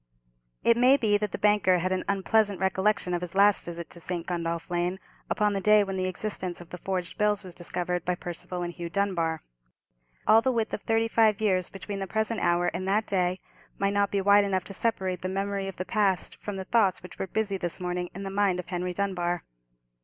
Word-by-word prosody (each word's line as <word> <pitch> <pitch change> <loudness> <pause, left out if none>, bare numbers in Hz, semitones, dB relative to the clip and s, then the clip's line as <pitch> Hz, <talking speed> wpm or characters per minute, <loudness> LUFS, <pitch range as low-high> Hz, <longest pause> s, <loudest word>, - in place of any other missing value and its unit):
It 235 - +4
may 255 +3 +6
be 210 -5 +2
that 210 -2 -2
the - - -3
banker 205 -3 +4
had 185 +2 -1
an 185 0 0
unpleasant 200 0 +2
recollection 190 0 +1
of 175 - -1
his 180 0 -6
last 200 0 +5
visit 170 -1 -6
to 170 - -9
St. 175 0 -4
Gundolph 170 -1 -3
Lane, 175 +1 0 0.3
upon 210 -1 +2
the 195 - -1
day 210 +1 +5
when 195 -1 -4
the 185 0 -1
existence 185 -2 -2
of 175 - -12
the 180 - -7
forged 185 +1 -3
bills 210 -1 +2
was 185 -2 -9
discovered 180 0 -2
by 180 - 0
Percival 175 +1 -5
and 175 0 -4
Hugh 170 -1 -6
Dunbar. 170 -4 -1 0.8
All 220 +1 +6
the 260 - +1
width 225 -3 -1
of - - -3
thirty 225 0 +1
five 220 -2 +3
years 185 -4 +1
between 195 +1 -6
the 195 - -3
present 220 +3 -1
hour 175 0 +2
and 185 +2 -3
that 210 +3 +2
day 185 -2 0 0.4
might 200 0 +1
not 200 -1 +2
be 200 - 0
wide 200 +1 +6
enough 190 -2 0
to 195 - -8
separate 190 -4 -1
the 185 - -2
memory 195 0 -2
of 195 - -6
the 185 - -4
past 200 -4 +1
from 205 - -5
the 190 - -5
thoughts 200 -6 +2
which 180 - -11
were 190 - -2
busy 205 0 -1
this 175 -1 -3
morning 180 -1 -3
in 195 - -5
the 195 - -4
mind 195 -2 +2
of 180 - -5
Henry 180 0 -2
Dunbar. 175 -3 -1
190 Hz, 225 wpm, -27 LUFS, 180-205 Hz, 0.8 s, may